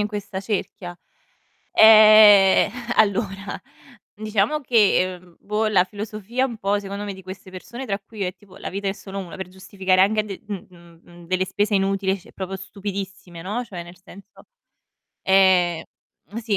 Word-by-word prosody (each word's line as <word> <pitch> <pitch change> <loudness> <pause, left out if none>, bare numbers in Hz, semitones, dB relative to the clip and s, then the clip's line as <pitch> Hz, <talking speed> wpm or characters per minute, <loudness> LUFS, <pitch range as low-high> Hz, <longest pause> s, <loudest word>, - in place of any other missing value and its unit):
in 210 - +1
questa 205 -2 -6
cerchia. 195 -3 -5 0.8
Eh, 215 -3 +7 0.3
allora 200 -1 0 0.5
diciamo 215 +7 -1
che, 230 -8 +3
ehm, 175 -1 -19
boh 210 +2 -1
la 195 -4 +3
filosofia 215 +5 -4
un 240 -4 -5
po' 205 0 0
secondo 200 +1 -6
me, 205 - -5
di 190 - -12
queste 185 0 -10
persone 240 +8 -8
tra 200 -2 -3
cui 215 +1 -15
io 195 - -1
e 180 - -3
tipo 195 -1 -20
"la - - -6
vita 200 +1 -4
è 195 - -1
solo 195 -1 -10
1" 180 -1 -8
per 190 -1 -7
giustificare 190 0 -1
anche 215 +2 +2
d 195 -3 -8
mhmm, 175 -4 -10
mhmm, 175 -1 -16
delle 185 +1 0
spese 205 +2 -1
inutili 195 0 0
c 200 +5 -18
proprio 190 0 -5
stupidissime, 195 -3 -7
no, 210 +8 -3
cioè 180 -5 -8
nel 175 +1 -14
senso 200 +1 -16 0.8
Eh, 185 -3 +3 0.6
sì 215 -3 0
195 Hz, 165 wpm, -22 LUFS, 185-210 Hz, 0.8 s, Eh